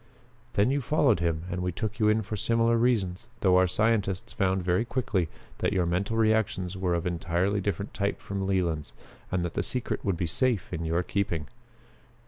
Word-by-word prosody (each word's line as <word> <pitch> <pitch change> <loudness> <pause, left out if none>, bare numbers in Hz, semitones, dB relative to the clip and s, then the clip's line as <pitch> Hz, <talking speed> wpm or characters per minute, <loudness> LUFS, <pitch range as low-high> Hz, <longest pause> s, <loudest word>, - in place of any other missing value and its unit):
"Then 105 +5 +3
you 140 +1 +1
followed 145 - +3
him 85 -2 0
and 90 0 -2
we 90 0 -1
took 110 +4 -4
you 105 -1 +4
in 110 +1 +2
for 105 +2 -4
similar 115 +2 +2
reasons, 115 -4 +1
though 90 -2 +5
our 95 0 +5
scientists 100 -1 0
found 95 -1 +1
very 90 +4 +2
quickly 115 -8 -1 0.3
that - - +1
your 90 -3 +2
mental 100 +6 0
reactions 110 -5 +1
were 90 -2 0
of 85 +1 -2
entirely 90 +3 0
different 100 +1 -3
type 100 0 -1
from 100 -1 -3
Leland's 85 -6 -1 0.4
and 90 -2 0
that 85 - -4
the - - 0
secret 125 -2 -3
would 95 -4 0
be 85 - -1
safe 115 +2 0
in 80 -1 -3
your 85 +2 +1
keeping. 85 -5 -1
95 Hz, 190 wpm, -28 LUFS, 90-110 Hz, 0.4 s, though